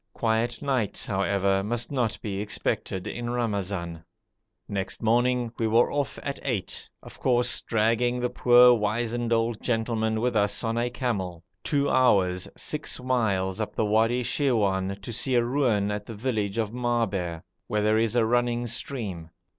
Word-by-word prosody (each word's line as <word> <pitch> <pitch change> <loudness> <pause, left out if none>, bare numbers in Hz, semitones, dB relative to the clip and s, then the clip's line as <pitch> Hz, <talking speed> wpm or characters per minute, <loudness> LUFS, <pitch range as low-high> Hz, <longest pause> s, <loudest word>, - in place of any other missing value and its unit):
Quiet 115 +2 -1
nights, 130 -7 0
however, 100 -1 +1
must 120 +4 -2
not 120 -6 -1
be 100 -2 -3
expected 95 -2 -2
in 120 0 -4
Ramazan. 100 -8 -2 0.6
Next 95 +1 -4
morning 120 +1 +2
we 115 - +1
were 115 +2 +3
off 145 -2 -2
at 140 -1 -4
eight, 110 -9 -3
of - - -12
course 120 -1 +2
dragging 115 +2 +1
the 125 0 -1
poor 125 0 +6
wizened 115 +2 -1
old 115 -1 +1
gentleman 110 -2 0
with 120 +1 0
us 105 +1 +2
on 115 0 -1
a 120 +1 0
camel, 95 -9 -3 0.2
two 140 -1 +1
hours 95 -10 +3
(6 - - -2
miles) 110 -6 0
up 110 - -4
the 110 - +1
Wadi 115 +4 +2
Shirwan 100 -8 0
to 120 - -6
see 125 +3 +1
a 120 -1 +3
ruin 120 -6 +1
at 105 0 -4
the 115 - -8
village 105 -3 -2
of 110 -2 -1
Maaber, 105 -9 -1 0.2
where 105 -1 0
there 110 +1 +3
is 115 +1 0
a 120 -2 +4
running 120 +1 +1
stream. 110 -8 -4
115 Hz, 160 wpm, -26 LUFS, 100-120 Hz, 0.6 s, poor